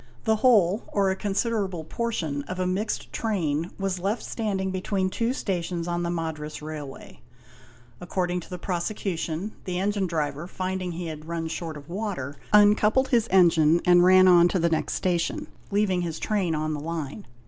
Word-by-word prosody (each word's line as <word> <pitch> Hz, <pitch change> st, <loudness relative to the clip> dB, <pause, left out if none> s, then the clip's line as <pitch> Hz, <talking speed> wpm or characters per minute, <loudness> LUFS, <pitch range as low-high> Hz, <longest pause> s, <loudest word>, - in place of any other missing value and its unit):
The 220 Hz, 0 st, +2 dB
whole, 210 Hz, -5 st, +4 dB
or 195 Hz, -2 st, +1 dB
a -, -, -1 dB
considerable 200 Hz, -3 st, -1 dB
portion, 160 Hz, -7 st, -2 dB
of 185 Hz, +4 st, -5 dB
a 185 Hz, -, +1 dB
mixed 195 Hz, +5 st, -2 dB
train 170 Hz, -7 st, -1 dB
was 195 Hz, -2 st, -2 dB
left 200 Hz, +6 st, -1 dB
stand 210 Hz, -4 st, -2 dB
ing 190 Hz, 0 st, -1 dB
between 185 Hz, 0 st, -1 dB
two 230 Hz, +4 st, 0 dB
stations 175 Hz, -7 st, -2 dB
on 175 Hz, 0 st, -1 dB
the 170 Hz, -, -1 dB
Madras 160 Hz, -3 st, -4 dB
Railway: 150 Hz, -3 st, -8 dB, 0.8 s
According 180 Hz, 0 st, -1 dB
to 175 Hz, -, -12 dB
the 180 Hz, -, -5 dB
prosecution, 175 Hz, 0 st, -3 dB
the 180 Hz, -2 st, -2 dB
engine 200 Hz, 0 st, 0 dB
driver, 155 Hz, -1 st, -2 dB
finding 185 Hz, -1 st, -3 dB
he 175 Hz, +1 st, -5 dB
had 155 Hz, -1 st, -7 dB
run 165 Hz, -1 st, -3 dB
short 160 Hz, -1 st, -5 dB
of 145 Hz, 0 st, -12 dB
water, 175 Hz, -8 st, -4 dB, 0.2 s
uncoupled 210 Hz, +5 st, +5 dB
his 235 Hz, -2 st, +3 dB
engine 170 Hz, -3 st, +5 dB
and 175 Hz, -1 st, +6 dB
ran 185 Hz, +1 st, +7 dB
on 175 Hz, -1 st, +7 dB
to 180 Hz, -, 0 dB
the 170 Hz, -1 st, +2 dB
next 160 Hz, -1 st, -1 dB
station, 175 Hz, -2 st, -1 dB, 0.2 s
leaving 200 Hz, -3 st, +1 dB
his 165 Hz, -2 st, -3 dB
train 190 Hz, -6 st, 0 dB
on 155 Hz, 0 st, -1 dB
the 150 Hz, -, -3 dB
line. 160 Hz, +4 st, -5 dB
180 Hz, 175 wpm, -26 LUFS, 165-200 Hz, 0.8 s, ran